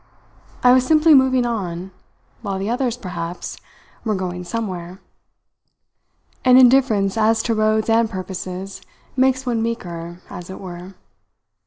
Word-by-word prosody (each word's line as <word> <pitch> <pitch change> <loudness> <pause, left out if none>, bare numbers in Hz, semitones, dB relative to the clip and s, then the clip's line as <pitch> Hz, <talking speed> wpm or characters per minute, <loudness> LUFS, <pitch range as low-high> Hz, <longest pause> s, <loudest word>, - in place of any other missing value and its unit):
I 250 - +7
was 255 0 +4
simply 310 +3 +5
moving 260 -2 +4
on, 190 -5 -4 0.5
while 200 -4 -3
the 195 +4 -2
others, 245 -1 -1
perhaps, 180 -5 -6 0.5
were 215 -2 0
going 180 -1 -4
somewhere. 185 -2 -5 1.4
An 255 0 +6
indifference 240 -6 +4
as 220 +1 +3
to 230 - 0
roads 215 0 +1
and 225 0 +3
purposes 190 -1 -6 0.3
makes 260 0 +2
one 235 -3 0
meeker, 175 -7 -5
as 175 0 -9
it 190 - -8
were. 180 0 -9
215 Hz, 130 wpm, -20 LUFS, 185-245 Hz, 1.4 s, I